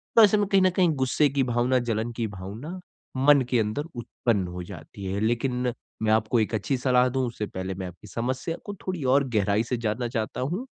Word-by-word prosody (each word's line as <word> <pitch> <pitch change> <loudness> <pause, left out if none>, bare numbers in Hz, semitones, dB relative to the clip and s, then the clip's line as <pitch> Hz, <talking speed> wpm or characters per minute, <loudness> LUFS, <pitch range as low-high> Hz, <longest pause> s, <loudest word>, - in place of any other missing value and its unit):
तो 225 - +9
ऐसे 210 0 +6
में 205 -1 +1
कहीं 195 -2 +4
न 185 - +5
कहीं 180 -1 +3
गुस्से 135 +2 +2
की 135 0 +1
भावना, 125 +1 +2
जलन 115 -1 -1
की 115 -1 -2
भावना 105 - -7 0.4
मन 140 +1 +6
के 125 - +3
अंदर 110 +7 -1
उत्पन्न 115 -5 -1
हो 90 0 -6
जाती 100 +3 -10
है। 95 +2 -2
लेकिन 125 +2 0 0.3
मैं 110 - +3
आपको 110 +2 +3
एक 110 +1 0
अच्छी 125 +6 0
सलाह 125 0 +3
दूँ। 130 0 0
उससे 110 -2 -4
पहले 95 +1 -4
मैं 95 -1 -5
आपकी 90 +4 -12
समस्या 130 - -2
को 205 - -5
थोड़ी 180 -6 -2
और 135 +1 +3
गहराई 105 +2 +2
से 120 +1 -2
जानना 120 +2 -1
चाहता 110 -2 -3
हूँ। 180 - -2
120 Hz, 215 wpm, -26 LUFS, 110-135 Hz, 0.4 s, तो